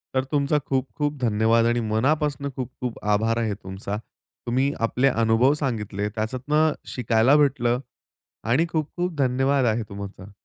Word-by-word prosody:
तर 130 - +2
तुमचा 145 0 +2
खूप-खूप 145 +3 -2
धन्यवाद 115 0 +3
आणि 120 +1 +2
मनापासून 140 +5 0
खूप-खूप 125 -1 -5
आभार 115 +2 +1
आहे 110 -3 0
तुमचा. 95 +1 -6 0.5
तुम्ही 130 +4 +1
आपले 125 +4 +1
अनुभव 115 +3 +3
सांगितले, 105 -8 -2
त्याच्यातनं 130 +8 0 0.2
शिकायला 120 +2 +3
भेटलं 125 -4 +2 0.7
आणि 155 +8 +3
खूप-खूप 170 +3 -2
धन्यवाद 135 +1 +2
आहे 115 0 +1
तुमचा. 100 -1 -8
125 Hz, 125 wpm, -24 LUFS, 110-140 Hz, 0.7 s, धन्यवाद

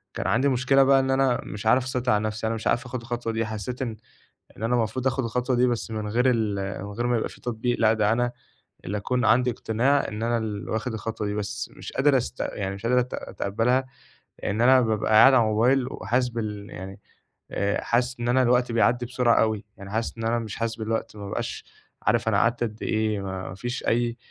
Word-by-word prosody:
كان - - -2
عندي 140 +2 +3
مشكلة 130 +2 +4
بقى 135 0 +5
إن 135 0 -1
أنا 135 -2 +2
مش 105 +2 -7
عارف 125 +3 +4
أسيطر 125 -1 -1
على 105 0 +2
نَفْسي، 110 +1 -2
أنا 115 - -1
مش 110 - -4
عارف 120 - +1
آخُد 125 -1 -5
الخطوة 120 -1 -3
دي 115 0 0
حسّيت 110 +4 -5
إن 115 -3 -4 0.6
إن - - -7
أنا 120 +2 +2
المفروض 120 +3 0
آخُد 130 0 0
الخطوة 125 +2 0
دي 125 +1 +4
بس 120 -1 -2
من 110 -1 -3
غير 120 +4 +1
ال 110 -4 0 0.3
من 100 - -7
غير 120 +4 -2
ما 120 -1 +2
يبقى - - -2
في - - -15
تطبيق 120 0 -2
لأ، 110 -1 +4
ده 105 -1 +2
أنا 120 +1 0 0.5
اللي 100 +4 -3
أكون 125 +4 -1
عندي 125 +3 +4
إقتناع 125 +5 +1
إن 105 0 -5
أنا 120 0 +1
اللي 105 -3 -4
واخد 110 +2 -2
الخطوة 110 0 -4
دي 105 - -2
بس 105 -1 -4
مش - - -8
قادر 140 0 +3
أست 125 - -5
يعني 95 -1 -3
مش 100 +4 -6
قادر 125 +1 +4
أت 125 +1 -4
أتقبّلها 125 +6 -1 0.6
إن 105 +3 -1
أنا 130 +1 +6
بابقى 110 -2 0
قاعد 135 +5 +8
على 120 -3 +6
الموبايل 120 +4 +2
وحاسس 125 +1 0
بال 105 -3 -5
يعني 95 +1 -8 0.5
آآ، 100 0 0
حاسس 125 +1 0
إن 120 - -2
أنا 130 +2 +4
الوقت 125 0 +2
بيعدّي 120 +1 +2
بسرعة 125 -1 +2
أوي، 110 -1 0
يعني 100 0 -10
حاسس 115 +2 -2
إن 115 - -5
أنا 115 +1 +1
مش 110 -3 -6
حاسس 115 0 -2
بالوقت 110 -1 -3
ما 100 -1 -7
بابقاش 100 - -4 0.4
عارف 115 -1 +1
أنا 100 - +2
قعدت 115 +3 +2
قدّ 110 -2 -4
إيه 110 -1 0
ما 95 -1 -5
فيش 120 +4 -4
أي 120 +1 +1
115 Hz, 225 wpm, -25 LUFS, 110-125 Hz, 0.6 s, قاعد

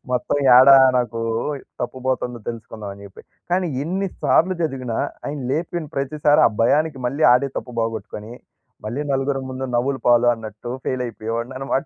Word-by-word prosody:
మొత్తం 125 +3 0 0.2
ఏడా 135 +1 +9 0.2
నాకు 115 -1 -2 0.6
తప్పు 125 +2 -5
పోతుందో 125 -2 -2
తెలుసుకుందాం 110 -3 -8
అని 100 0 -13
జెప్పి. 95 - -14 0.3
కానీ 180 -1 +1 0.2
ఎన్ని 190 +3 -2
సార్లు 185 +3 +3
చదివినా, 130 -6 -2 0.3
ఆయన 145 +1 -4
లేపిన 165 -1 -3
ప్రతిసారి 145 +2 +2
ఆ - - -9
భయానికి 150 +2 +2
మళ్ళీ 140 +5 0
ఆడే 135 +3 +3
తప్పు 125 -2 -9
బోగొట్టుకొని, 110 0 -5 0.5
మళ్ళీ 120 +6 -3
నలుగురు 135 0 0
ముందు 130 +1 -5
నవ్వులు 135 +2 0
పాలు 120 0 +5
అన్నట్టు. 110 +1 -8 0.2
ఫెయిల్ 130 -1 -1
అయిపోయేవాడిని 115 +3 -5
అనమాట. 135 +1 -1
130 Hz, 150 wpm, -21 LUFS, 115-145 Hz, 0.6 s, ఏడా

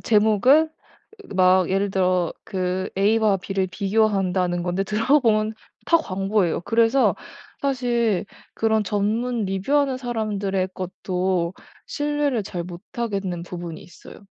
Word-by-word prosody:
제목은 225 +9 +4 0.7
막 185 -1 +4
예를 195 +1 +1
들어 185 -3 +1
그 185 0 -2
A와 210 0 +3
B를 190 0 -2
비교한다는 190 -3 +1
건데 180 +2 -1
들어보면 220 0 +2 0.3
다 335 - +5
광고예요. 195 - 0
그래서 230 +6 +3 0.5
사실 240 -7 0 0.3
그런 220 -1 +1
전문 215 +3 -1
리뷰 195 +8 -2
하는 275 -3 +2
사람들의 205 -6 -2
것도 185 -1 -2 0.3
신뢰를 290 -6 -1
잘 175 -2 -5
못하겠는 185 0 -4
부분이 175 -2 -7
있어요. 175 - -14
200 Hz, 260 characters per minute, -23 LUFS, 185-225 Hz, 0.7 s, 다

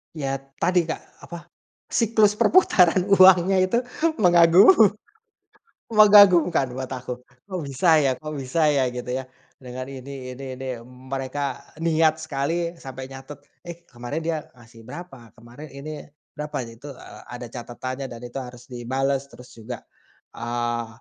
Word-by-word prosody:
Iya 140 -3 -4 0.3
tadi 180 0 +3
Kak, 160 - -4 0.3
apa 170 - -7 0.5
siklus 220 -2 +3
perputaran 185 - +4
uangnya 185 0 +6
itu 185 +5 +1 0.5
mengagum 175 - +7 1.2
mengagumkan 200 - +6
buat 130 -1 -5
aku, 125 -1 -5 0.4
kok 185 -2 -4
bisa 140 +6 -1 0.2
ya 135 - +3
kok 155 0 -6
bisa 135 +4 -3 0.2
ya? 135 - +3
Gitu 125 0 -7
ya. 130 - -6 0.3
Dengan 130 0 -8
ini 130 -1 -8
ini 135 - -9
ini 130 +1 -8 0.2
m 125 +1 -16
mereka 135 +1 -3 0.4
niat 160 -1 +3
sekali 165 +3 -2
sampai 130 0 -8
nyatet, 135 +2 -10 0.3
“Eh, 170 -1 -7
kemarin 125 +5 -6
dia 160 -1 -1 0.2
ngasih 115 -1 -17
berapa? 125 -7 -11
Kemarin 120 +7 -12
ini 140 +3 -8 0.5
berapa?” 150 0 -5
Itu 130 +5 -10
a - - -13
ada 120 0 -7
catatannya 130 +3 -6
dan 115 - -9
itu 120 +2 -7
harus 125 -2 -9
dibales 135 +3 -2
terus 125 0 -14
juga, 115 +2 -8 0.5
eee, 120 0 -2
135 Hz, 140 wpm, -23 LUFS, 125-170 Hz, 1.2 s, mengagum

